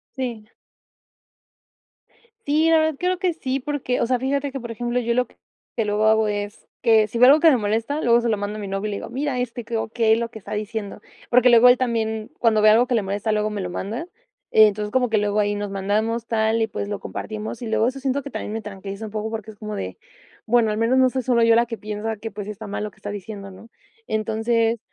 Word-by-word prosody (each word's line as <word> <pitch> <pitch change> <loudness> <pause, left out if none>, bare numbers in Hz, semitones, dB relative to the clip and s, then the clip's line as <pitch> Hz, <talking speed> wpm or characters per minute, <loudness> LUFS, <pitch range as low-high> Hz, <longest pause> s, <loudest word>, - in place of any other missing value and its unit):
Sí. 240 -5 -5 1.9
Sí, 310 +3 +3
la 325 - +6
verdad, 315 -1 +1
creo 360 0 0
que 365 -3 +1
sí, 270 -4 -2
porque, 275 -3 -2
o - - +3
sea, 250 +1 +1
fíjate 280 +2 -1
que, 270 - -5
por 235 -1 -8
ejemplo, 240 +2 -2
yo 235 -1 0
lo 250 +1 +1
que - - -26 0.4
que 225 - 0
luego 210 +1 +1
hago 220 0 +4
es 205 0 -4 0.2
que 220 -2 +5
si 230 - -5
veo 250 +2 +7
algo 295 +3 +7
que 325 0 +6
me 265 - +4
molesta, 225 +7 -1
luego 235 0 +4
se 235 - 0
lo 215 - +1
mando 205 +1 -4
a - - -6
mi 205 - -5
novio 195 +2 -3
y - - -4
le 200 - -3
digo: - - -7
"Mira, 265 +1 -2
este, 240 -1 -4
¿qué 230 +1 -5
o 220 - -2
qué 220 -1 +2
lo 230 0 -2
que 225 - -10
está 190 - -11
diciendo?", 210 -1 -4 0.3
porque 250 +1 +6
luego 235 +1 +7
él 245 - +6
también, 220 -3 -1
cuando 220 -2 +3
ve 215 - +7
algo 225 +3 +5
que 250 - -2
le 225 - +2
molesta, 205 +2 -2
luego 215 0 +1
me 210 - -4
lo 180 -1 -4
manda. 220 - -4 0.5
Entonces, 210 -1 +4
como 250 0 +2
que 220 - +2
luego 205 0 +1
ahí 205 0 +1
nos 205 -1 -4
mandamos 215 +4 -1
tal 220 0 +1
y 220 - +2
pues, 200 -1 -5
lo 205 - -3
compartimos 220 +2 -6
y - - -4
luego 220 +1 +2
eso 265 +2 -3
siento 270 +1 -1
que 280 - -8
también 210 - -5
me 225 - -3
tranquiliza 200 0 -7
un 215 - -8
poco 215 +1 -3
porque 220 -1 -5
es 210 - -19
como 210 0 -6
de: 95 - -5 0.5
"Bueno 230 -1 +3
al 210 - -1
menos 235 +4 +2
no 260 - +5
soy 260 0 -3
solo 240 -1 +2
yo 230 0 +5
la 235 +1 +4
que 230 -1 -6
piensa 215 +1 -4
que, 225 +2 -6
pues, 205 -1 -7
está 210 +1 -7
mal 205 +1 -4
lo 210 - -4
que - - -27
está 205 -1 -7
diciendo", 205 0 -7
¿no?, 195 +4 -14 0.4
entonces, 225 - 0
225 Hz, 260 wpm, -22 LUFS, 210-245 Hz, 1.9 s, veo